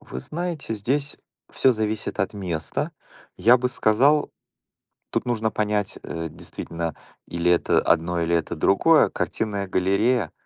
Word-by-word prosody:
Вы 65 - -7
знаете, 165 - -4
здесь 140 +7 -1 0.3
всё 130 - +3
зависит 110 -2 -2
от 95 +2 -1
места. 95 - -3 0.4
Я 120 +3 +6
бы 125 0 -1
сказал, 130 +7 +3 0.8
тут - - -1
нужно 110 -3 0
понять, 105 -1 -1
э, 80 0 -4
действительно, 85 0 -6 0.3
или 85 +1 0
это 85 - +3
одно, 85 +1 +1
или 85 +1 +1
это 85 +1 -1
другое. 125 - +4
Картинная 100 -3 -2
галерея? 100 +2 +1
105 Hz, 130 wpm, -24 LUFS, 85-125 Hz, 0.8 s, Я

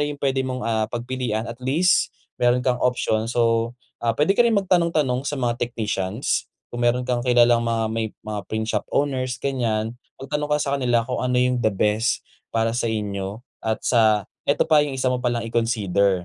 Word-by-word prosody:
yung 145 - -5
pwede 135 -1 +1
mong, 130 -1 -3
ah, 110 -1 0
pagpilian 120 -2 -3
at 115 +1 -8
least 155 +9 +3 0.3
meron 125 +1 +3
kang 125 -1 +1
option. 115 -3 +1
So, 115 0 +1 0.2
ah, 115 -1 0
pwede 150 +6 +3
ka 200 - +1
rin 235 -2 +4
magtanong 175 -4 +2
tanong 130 -2 +1
sa 145 - -2
mga 120 -3 -1
technicians, 110 -2 -1 0.2
kung 120 - -4
meron 120 +1 +2
kang 125 -1 0
kilalang 120 -1 +4
mga 115 -1 0
may 115 0 -1 0.2
mga 105 -1 -3
print 110 0 -2
shop - - -2
owners 130 -3 0
ganyan, 115 -5 -1 0.2
magtanong 150 +2 -3
ka 150 - +3
sa 140 -1 -1
kanila 120 -2 +2
kung 125 +2 -3
ano 125 0 0
yung 125 0 +2
the 110 - +3
best 105 +3 0 0.2
para 115 0 0
sa 120 0 0
inyo 105 0 -3 0.2
at 110 0 -2
sa 110 -4 +3 0.2
eto 140 - +3
pa 155 -2 +5
yung 145 -2 -2
isa 130 -1 +1
mo 125 - -1
palang 120 -2 -1
i-consider, 100 -5 +1
120 Hz, 190 wpm, -23 LUFS, 115-130 Hz, 0.3 s, pa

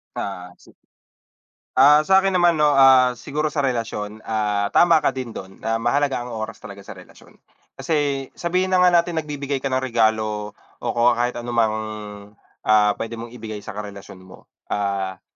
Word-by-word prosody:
Ah, 90 -2 -6
se - - -20 1.1
Ah, 145 +3 +7
sa'kin 190 +3 +3
naman, 175 -2 +3
'no? 150 -1 +3
Ah, 130 -2 +6
siguro 145 +5 -3
sa 150 -1 -1
relasyon, 115 -5 -3
ah, 105 -2 0
tama 170 -2 +6
ka 150 - 0
din 130 -3 -5
do'n 95 -3 -10
na 115 +1 -1
mahalaga 135 +4 0
ang 120 -1 -6
oras 110 -1 -6
talaga - - -11
sa - - -11
relasyon. - - -18 0.4
Kasi 145 -4 -1
sabihin 185 +2 -1
na 180 - +4
nga 180 - +6
natin 170 -2 +1
nagbibigay 140 -2 -4
ka 135 - -2
ng 130 - +1
regalo 110 -4 0 0.3
o - - -5
ko 120 +1 +3
kahit 120 +1 -1
anumang, 120 -2 0 1.0
ah, 105 -1 +4
pwede 115 +1 -5
mong 115 +1 -8
ibigay 110 -2 -7
sa - - -8
karelasyon 100 -2 -9
mo. 95 0 -17 0.2
Ah, 100 -2 -3
120 Hz, 170 wpm, -22 LUFS, 110-145 Hz, 1.1 s, Ah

